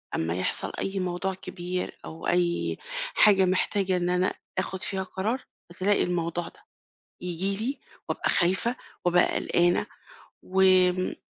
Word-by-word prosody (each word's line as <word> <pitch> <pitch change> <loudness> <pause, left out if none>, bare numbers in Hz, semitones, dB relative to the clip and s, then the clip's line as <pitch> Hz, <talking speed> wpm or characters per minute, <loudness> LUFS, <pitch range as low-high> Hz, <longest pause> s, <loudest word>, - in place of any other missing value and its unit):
أمّا 80 +1 -1
يحصل 95 - +2
أي 195 0 -2
موضوع 185 +1 -2
كبير 180 -1 -5
أو 160 +1 -7
أي 175 -1 +1 0.4
حاجة 195 -3 +6
محتاجة 185 +1 +1
إن 175 0 -1
أنا 180 +1 +1 0.2
آخُد 185 0 -2
فيها 190 -1 -1
قرار، 215 +7 -3 0.3
فتلاقي 190 +4 +1
الموضوع 170 -1 -2
ده - - -14 0.6
ييجي 180 +3 -1
لي 270 +2 -3 0.3
وأبقى - - -1
خايفة، 190 +8 +2 0.3
وأبقى 175 0 +3
قلقانة 175 +1 +2 0.6
وم 185 -1 +3
185 Hz, 130 wpm, -26 LUFS, 175-190 Hz, 0.6 s, حاجة